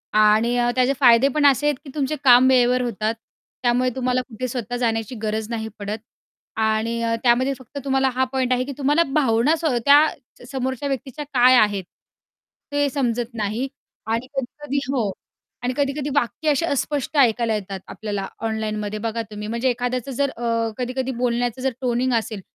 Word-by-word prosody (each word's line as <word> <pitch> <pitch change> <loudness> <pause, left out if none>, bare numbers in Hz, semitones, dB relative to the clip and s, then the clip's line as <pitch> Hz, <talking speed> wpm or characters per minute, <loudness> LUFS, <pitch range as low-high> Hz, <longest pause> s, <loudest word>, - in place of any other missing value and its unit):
आणि 215 +3 +4
अ, 240 0 +2
त्याचे 255 +2 +3
फायदे 245 0 +6
पण 300 -1 +3
असे 280 +1 +4
आहेत 295 - +2
की - - -9
तुमचे 295 0 -1
काम 250 -1 +7
वेळेवर 250 0 +4
होतात, 220 -2 -1 0.5
त्यामुळे 250 +1 +2
तुम्हाला 255 -1 0
कुठे 255 0 -6
स्वतः 245 -1 -4
जाण्याची 225 0 -1
गरज 215 +1 -2
नाही 220 -1 -3
पडत 205 +1 -3 0.6
आणि 220 +1 0
अ, 230 0 +1
त्यामध्ये 255 +3 +3
फक्त 260 +3 -12
तुम्हाला 265 -1 +2
हा 260 - +2
पॉइंट 255 -1 +1
आहे 250 - +1
की 280 - -5
तुम्हाला 295 +4 +3
भावना 265 +1 +3
स 325 0 -6 0.2
त्या 290 +2 +7 0.5
समोरच्या 260 +1 -2
व्यक्तीच्या 270 +2 -4
काय 255 0 +6
आहेत, 205 -5 +3 0.9
ते 290 0 +2
समजत 245 -3 -1
नाही 220 +3 -2 0.4
आणि 230 +3 -1
कधी-कधी 280 +2 -3
हो 230 -7 0 0.5
आणि 250 +1 0
कधी-कधी 285 0 -1
वाक्य 285 +4 0
अशी 300 +3 +2
अस्पष्ट 290 0 -2
ऐकायला 235 -3 +3
येतात 195 -2 -5
आपल्याला 205 -3 -4 0.2
ऑनलाईनमध्ये 215 -1 -3
बघा 230 +1 -2
तुम्ही. 210 0 -6
म्हणजे 235 +4 0
एखाद्याचं 245 +1 -2
जर 280 +2 0
अ, 230 -2 -1
कधी-कधी 255 +1 -2
बोलण्याचं 245 0 0
जर 265 0 0
टोनिंग 250 +1 0
असेल 220 -3 -1
245 Hz, 170 wpm, -22 LUFS, 225-270 Hz, 0.9 s, काम